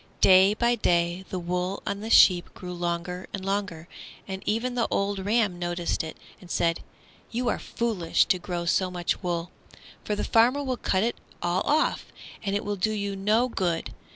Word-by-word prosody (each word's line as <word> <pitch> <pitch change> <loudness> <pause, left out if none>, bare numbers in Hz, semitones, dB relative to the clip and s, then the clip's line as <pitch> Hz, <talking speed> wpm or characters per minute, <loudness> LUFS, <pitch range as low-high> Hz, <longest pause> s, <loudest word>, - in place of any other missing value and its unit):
Day 190 +2 +6
by 235 +2 +2
day 175 -4 +1
the 185 - -3
wool 180 +2 -2
on 200 - -2
the 220 +2 -6
sheep 180 -5 +6
grew 180 -1 -7
longer 175 +1 -3
and 190 -1 -7
longer, 195 -5 -2 0.4
and 190 0 -5
even 230 +4 0
the 240 -2 0
old 200 0 0
ram 205 -2 +1
noticed 175 -1 -1
it 160 - -7 0.2
and 180 - -15
said, 165 0 +1 0.5
"You 240 +1 -1
are - - -1
foolish 215 -8 0
to 185 - +1
grow 175 -1 -4
so 185 +2 +2
much 175 -1 -2
wool, 175 -1 -2 0.5
for 210 - -1
the - - -2
farmer 245 +5 +3
will 260 -2 -2
cut 190 -3 +1
it 235 +1 -1 0.3
all 175 +2 +1
off, 305 +2 +1 0.4
and 200 -1 -1
it 205 - -2
will 205 0 -2
do 215 +4 0
you 200 -1 -3
no 215 +5 +2
good. 180 -8 -2
190 Hz, 185 wpm, -26 LUFS, 175-215 Hz, 0.5 s, Day